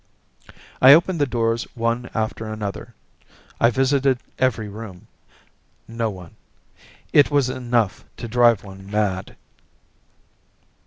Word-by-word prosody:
I 130 +2 +10
opened 170 +1 +3
the 145 - +2
doors 115 -1 -1
one 115 +1 -2
after 110 0 -3
another. 110 +1 -6 0.6
I 115 - +5
visited 135 +1 +2 0.2
every 120 -4 0
room. 100 -3 -10 0.8
No 115 -1 -2
one. 90 -4 -11 0.8
It 145 - +6
was 140 -3 +2
enough 120 -5 -1
to 120 - -6
drive 120 -2 +3
one 95 -1 -12
mad. 100 -3 -2
115 Hz, 110 wpm, -22 LUFS, 105-130 Hz, 0.8 s, I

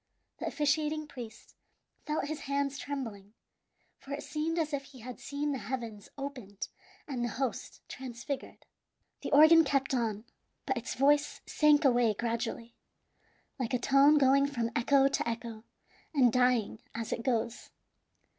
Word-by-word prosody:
The - - -3
officiating 305 +1 0
priest 235 -6 -10 0.5
felt 300 -1 0
his 310 +1 -4
hands 280 0 0
trembling; 225 -7 -6 0.6
for 275 - -12
it 285 - -4
seemed 315 +2 -2
as 315 -2 -1
if 275 -1 -2
he 265 -4 -14
had 250 +2 -8
seen 290 +1 -3
the 270 - -2
heavens 230 -4 -5
opened 250 -8 -6 0.4
and 255 -5 -3
the - - +1
host 265 -1 -4
transfigured. 260 +1 -6 0.6
The - - -5
organ 315 +3 +8
kept 275 -2 0
on, 225 -3 -1 0.4
but 265 - 0
its 235 - -4
voice 290 +2 +2
sank 300 -1 +4
away 240 -4 +4
gradually, 230 +1 -3 0.9
like 250 -1 -1
a - - +3
tone 275 +4 +5
going 275 0 +5
from 235 -4 -2
echo 270 +3 +4
to 275 -3 0
echo, 230 -1 -6 0.5
and 250 -5 +5
dying 250 -4 +2
as 230 -1 -3
it - - -3
goes. 235 -1 -1
265 Hz, 145 wpm, -31 LUFS, 235-285 Hz, 0.9 s, organ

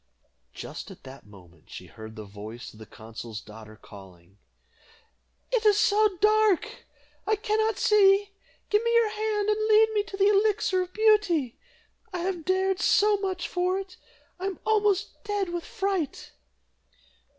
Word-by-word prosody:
Just - - -8
at - - -14
that 135 -3 -13
moment 90 -6 -18
she - - -9
heard 110 0 -11
the 110 -2 -8
voice 105 +4 -10
of 110 - -17
the 110 - -11
consul's 110 0 -9
daughter 110 0 -13
calling, 95 -1 -16 1.1
"It - - +1
is 420 -2 +4
so 420 -2 +3
dark, 425 -1 +2 0.4
I 435 - +3
cannot 435 0 0
see; 400 -1 +4 0.4
give 420 0 +3
me 465 - +1
your 465 -2 +4
hand, 425 -1 -1
and 430 +1 0
lead 440 0 +5
me 420 - +2
to 395 - -8
the 395 +1 +4
Elixir 410 -2 +2
of 365 0 -5
Beauty. 405 - +2 0.5
I 360 -2 -4
have 355 -3 -3
dared 375 0 +1
so 415 +3 +3
much 375 -3 -3
for 360 +1 -1
it! 385 -1 -8 0.4
I 380 - -3
am 390 - -4
almost 420 -3 0
dead 410 -3 -2
with 345 -1 -4
fright." 390 - -3
390 Hz, 155 wpm, -26 LUFS, -, 1.1 s, lead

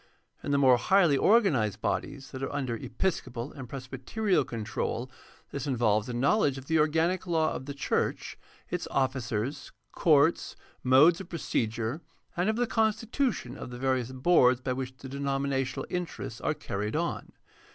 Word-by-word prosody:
In - - -5
the 140 - +3
more 130 -3 +6
highly 175 +1 +4
organized 135 - +3
bodies 140 +4 -3
that 130 - -7
are 135 - -3
under 130 -5 -2
episcopal 130 -2 -3
and 130 -4 -9
presbyterial 135 - -1
control 120 +2 -4 0.4
this 140 0 -4
involves 115 -4 +1
a - - -3
knowledge 140 - +2
of 135 - -8
the 160 +2 +2
organic 165 +4 +1
law 160 -2 +1
of 130 - -6
the 140 - -5
church, - - -1 0.4
its - - -2
officers, 130 -1 -2 0.2
courts, 155 0 +3 0.3
modes 150 +8 +6
of 185 - -11
procedure, 120 -4 -2 0.3
and 180 +4 +1
of 220 - +1
the 245 +1 +1
constitution 225 - 0
of - - -8
the 120 - -7
various 130 -1 0
boards 130 -2 +4
by 130 0 -2
which 130 0 -5
the 135 - -9
denominational 135 -1 -2
interests 165 -9 -4
are 155 - 0
carried 105 -1 -4
on. 170 +2 -2
135 Hz, 155 wpm, -29 LUFS, 125-165 Hz, 0.4 s, more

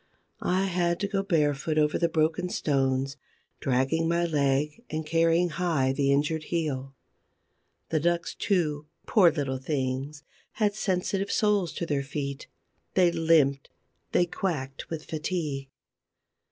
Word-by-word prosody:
I 185 +2 +2
had 175 -2 0
to 200 - +1
go 195 -1 0
barefoot 155 -5 +1
over 150 0 +2
the 170 - +2
broken 160 +2 +1
stones, 135 -3 0 0.4
dragging 135 +6 +1
my 170 +1 +2
leg 145 +3 0
and 155 0 -3
carrying 165 +2 +3
high 155 -6 +1
the 140 0 +1
injured 150 +3 +1
heel. 135 -5 -2 0.9
The 160 - +1
ducks, 170 +2 0
too, 155 -7 0 0.2
poor 190 -6 +6
little 135 -4 -2
things, 135 +1 -3 0.3
had 210 -2 +1
sensitive 195 -1 -1
soles 205 -6 +2
to 170 - -3
their 145 -3 0
feet; 140 0 -5 0.5
they 180 -2 +5
limped, 160 -5 +3 0.4
they 175 - +3
quacked 150 -7 -4
with 160 -2 -5
fatigue. 150 -4 -3
155 Hz, 130 wpm, -27 LUFS, 140-175 Hz, 0.9 s, poor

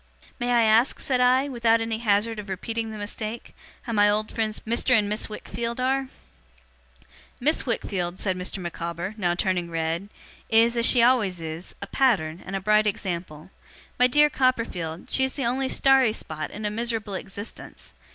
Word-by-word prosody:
'May 245 - -1
I 240 -1 +4
ask,' 225 +4 +3
said 255 -2 0
I, 255 +2 +4
'without 235 -4 +2
any 225 -1 -2
hazard 215 0 +1
of 205 -1 -8
repeating 225 +4 -3
the 215 - -7
mistake, 215 +2 -5 0.3
how 235 - -4
my 205 -1 +5
old 215 +1 0
friends 215 -1 -2
Mr. 235 +2 +2
and 210 -2 +1
Miss 210 +2 -3
Wickfield 230 +3 -5
are?' 265 +1 0 1.3
'Miss 295 +2 +1
Wickfield,' 185 -6 -2
said 190 -2 0
Mr. 180 +2 -3
Micawber, 170 +1 -5
now 175 -5 0
turning 180 -1 -1
red, 165 +4 -2 0.4
'is, 230 +1 +4
as 235 0 +4
she 240 -3 +5
always 220 -8 +3
is, 160 +2 -7
a - - -4
pattern, 190 -9 +1
and 195 - -6
a - - 0
bright 215 +2 +3
example. 175 -4 -4 0.5
My 250 - +6
dear 295 +3 +4
Copperfield, 225 -11 -1
she 265 - +3
is 265 - -1
the 275 - -3
only 260 +2 0
starry 265 -4 +4
spot 155 -6 -4
in 210 +1 -7
a 210 - -1
miserable 225 -2 -3
existence. 200 +3 -8
215 Hz, 175 wpm, -25 LUFS, 185-240 Hz, 1.3 s, My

